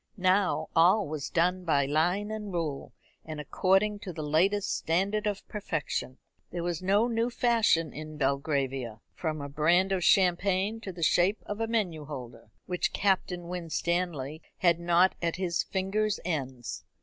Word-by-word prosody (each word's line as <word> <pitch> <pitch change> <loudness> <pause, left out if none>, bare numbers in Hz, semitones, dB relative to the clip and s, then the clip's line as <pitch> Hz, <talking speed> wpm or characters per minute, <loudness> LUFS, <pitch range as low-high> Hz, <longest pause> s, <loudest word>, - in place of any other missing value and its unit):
Now 185 0 +2
all 185 +5 +5
was 150 -1 -4
done 180 +2 +1
by 145 -5 +2
line 175 +9 +1
and 210 -2 -5
rule, 160 -6 -3 0.3
and 155 -1 -7
according 195 +7 +1
to 195 - -6
the 155 -2 -6
latest 185 +7 +2
standard 200 +6 0
of 205 -1 -3
perfection. 165 -9 -3 0.3
There 175 -1 -4
was 175 -1 -2
no 200 +5 +3
new 230 0 0
fashion 225 - +2
in 155 0 -8
Belgravia 135 -4 -1
from 155 -3 -3
a 140 - -4
brand 170 +7 +2
of 190 -2 0
champagne 190 +4 +3
to 195 - -6
the 175 -2 -6
shape 180 +6 +3
of 205 +1 -5
a 225 - 0
menu 185 -10 -1
holder 120 -6 -9 0.2
which 180 -1 -1
Captain 180 -3 0
Winstanley 170 -3 -2 0.2
had 170 -2 +3
not 175 +2 +4
at 170 -1 0
his 180 -3 0
finger's 205 +2 -1
ends. 135 -8 -4
175 Hz, 155 wpm, -29 LUFS, 155-195 Hz, 0.3 s, all